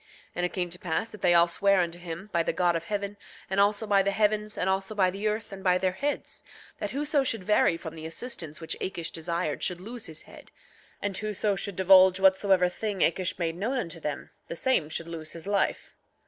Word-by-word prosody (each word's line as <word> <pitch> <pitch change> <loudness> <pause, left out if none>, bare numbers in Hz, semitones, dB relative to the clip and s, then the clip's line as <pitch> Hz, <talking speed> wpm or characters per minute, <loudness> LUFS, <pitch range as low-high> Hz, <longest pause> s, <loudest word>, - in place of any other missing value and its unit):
8:14 - - -38
And 180 - +1
it - - -15
came 180 -2 -1
to 180 - -5
pass 185 +4 -2
that 210 - -11
they 175 -1 +5
all 170 0 +7
sware 195 +2 +3
unto 175 -1 -1
him, 175 +4 -7
by 170 - +3
the - - 0
God 175 -2 +2
of 165 0 -3
heaven, 205 0 -3 0.3
and 190 - +1
also 205 +2 +3
by 200 -2 +4
the 195 - +1
heavens, 210 +1 0
and 180 - 0
also 190 +2 -1
by 185 -3 +3
the 200 +3 -2
earth, 215 0 -2
and 190 -1 -9
by 180 -1 +4
their 185 0 +1
heads, 285 +10 -3 0.4
that - - -2
whoso 290 0 +1
should 225 -6 -2
vary 185 -4 +3
from 160 -1 -8
the 160 -1 -7
assistance 165 - -6
which 160 - -4
Akish 170 -4 -3
desired 170 -1 -2
should 180 -2 -2
lose 230 +5 -6
his 155 -1 -9
head; - - -15 0.5
and 200 -1 -1
whoso 210 0 0
should 195 0 -4
divulge 190 0 +6
whatsoever 190 -1 +4
thing 200 +1 -3
Akish 180 +2 +2
made 165 -2 -1
known 225 +9 -1
unto 170 -8 -3
them, 150 -2 -5 0.2
the - - -5
same 170 -7 +1
should 165 +1 -4
lose 160 -2 -6
his 165 +1 -8
life. 200 0 0
190 Hz, 230 wpm, -28 LUFS, 170-205 Hz, 0.5 s, all